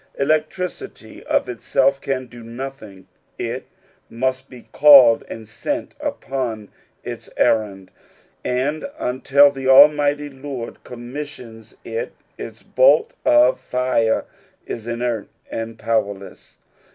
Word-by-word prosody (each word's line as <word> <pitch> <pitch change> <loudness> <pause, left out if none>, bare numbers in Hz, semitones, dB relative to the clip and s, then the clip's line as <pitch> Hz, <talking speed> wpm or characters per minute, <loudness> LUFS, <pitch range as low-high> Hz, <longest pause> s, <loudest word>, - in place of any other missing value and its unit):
Electricity 155 +5 -3
of - - +1
itself 135 +3 0
can 130 -1 -2
do 120 -1 -13
nothing, 115 -5 -9 0.3
it - - -5 0.4
must 130 +2 -2
be 125 -2 -13
called 135 -6 +7
and 110 -1 -8
sent 290 - -4
upon 130 - -4 0.3
its - - -8
errand: 100 -4 0 0.5
and 140 - -2
until 135 +3 +3
the 135 -1 -5
almighty 145 +1 +5
Lord 135 -3 -8
commis 125 +5 -7
sions 115 -6 -13
it, 475 +1 -4 0.2
its - - -9
bolt - - +3
of 305 0 +4
fire 125 -3 0 0.4
is 115 0 -7
inert 120 -2 -2 0.2
and 115 0 -5
powerless. 100 -4 -3
130 Hz, 110 wpm, -20 LUFS, 115-145 Hz, 0.5 s, called